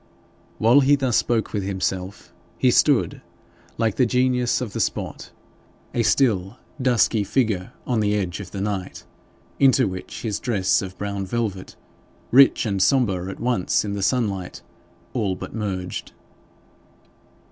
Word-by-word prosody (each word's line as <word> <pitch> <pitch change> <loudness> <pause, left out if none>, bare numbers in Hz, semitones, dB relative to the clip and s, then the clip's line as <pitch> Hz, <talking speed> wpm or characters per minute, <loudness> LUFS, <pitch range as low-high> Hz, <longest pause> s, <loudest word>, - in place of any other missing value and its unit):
While 120 +5 +5
he 145 +1 +4
thus 130 -5 0
spoke 115 -2 0
with 105 - -1
himself, 95 0 -4 0.2
he - - +3
stood, - - +2 0.6
like 110 -3 0
the 125 - +4
genius 125 0 +1
of 115 -6 -5
the - - -3
spot, - - -3 0.6
a 120 - +1
still 110 -3 +1 0.2
dusky 120 -4 +2
figure 105 -5 -1
on 120 -3 0
the 105 -1 +1
edge 95 -3 -2
of 100 -3 -8
the 100 - -6
night, 100 -3 -4 0.5
into 135 -1 +5
which 95 -1 -7
his 110 -4 -2
dress 105 -7 +1
of 95 -2 -7
brown 100 -1 -4
velvet, 105 -4 -3 0.6
rich 135 0 +6
and 100 -3 -1
sombre 95 -8 +2
at 95 - -8
once 115 -5 0
in 100 - -3
the 100 - -3
sunlight, 100 -5 -1 0.5
all 105 -7 -1
but - - -8
merged. 95 -5 -4
105 Hz, 145 wpm, -23 LUFS, 95-125 Hz, 0.6 s, rich